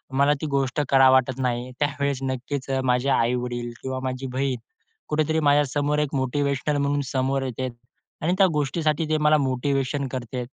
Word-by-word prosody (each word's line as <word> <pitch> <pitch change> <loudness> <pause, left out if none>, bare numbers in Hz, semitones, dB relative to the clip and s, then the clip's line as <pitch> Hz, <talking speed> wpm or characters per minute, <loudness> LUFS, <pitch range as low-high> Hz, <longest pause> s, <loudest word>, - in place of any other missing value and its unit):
मला 140 +2 +4
ती 155 - -2
गोष्ट 135 +2 0
करावी 135 -1 +6
वाटत 130 0 +2
नाही. 125 0 -1
त्यावेळेस 140 -2 -1
नक्कीच 130 +1 -4 0.2
माझे 125 +3 +1
आईवडील 120 -1 0
किंवा 130 0 -3
माझी 130 +1 -4
बहीण 130 -1 0 0.5
कुठेतरी 155 +1 +1
माझ्यासमोर 145 +1 +1
एक 145 -1 -1
मोटिव्हेशनल 140 +2 0
म्हणून 145 0 +1
समोर 135 +1 +1
येते 130 0 -3 0.5
आणि 175 +3 +2
त्या 195 - +6
गोष्टीसाठी 150 +2 0
ते 155 - +2
मला 150 0 +4
मोटिव्हेशन 135 +1 0
करते. 125 -1 -4
135 Hz, 155 wpm, -24 LUFS, 130-145 Hz, 0.5 s, करावी